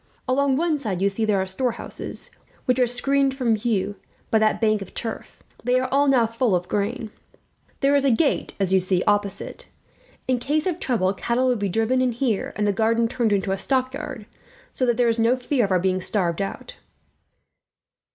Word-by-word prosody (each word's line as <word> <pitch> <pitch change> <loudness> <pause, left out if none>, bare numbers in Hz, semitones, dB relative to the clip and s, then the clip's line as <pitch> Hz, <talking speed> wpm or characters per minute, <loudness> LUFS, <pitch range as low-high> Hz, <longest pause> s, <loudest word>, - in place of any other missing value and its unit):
"Along 270 +1 +2
one 320 -1 +1
side 205 -9 -3
you 200 +1 +2
see 220 +3 -1
there 210 -2 +2
are 190 - 0
storehouses, 235 +5 -4 0.3
which 255 -1 +2
are 250 - +4
screened 275 +2 +1
from 245 -4 +1
view 205 -2 -1 0.3
by 220 - +4
that 215 0 +2
bank 215 -2 +2
of 195 - -9
turf. 225 -2 -6 0.2
They 250 +2 +2
are 255 - -1
all 285 +1 +3 0.2
full, 230 +1 0
now, - - +5
of 175 0 -7
grain. 215 +3 -2 0.7
There 275 0 +3
is 280 - +3
a 275 - +3
gate, 275 +5 +1
as 190 -1 +1
you 190 - +6
see, 185 0 +1
opposite. 205 - -1 0.6
In 255 -1 +1
case 300 +5 0
of 360 -2 -1
trouble 205 - +1
cattle 240 +5 0
will 250 - +2
be 205 -3 -2
driven 225 +6 +1
in 250 -2 +1
there, 235 -7 0
and 210 - 0
the 205 - +2
garden 230 +2 +2
turned 235 -2 0
into 195 -1 +1
a 195 - -1
stockyard, 265 0 -2 0.5
so 255 - 0
that 240 - +2
there 245 -1 +3
is 230 0 +1
no 230 +3 +3
fear 250 -1 +1
of 195 - -4
our 185 - +3
being 185 +1 0
starved 180 -3 -1
out." 195 - -6
230 Hz, 200 wpm, -23 LUFS, 200-255 Hz, 0.7 s, you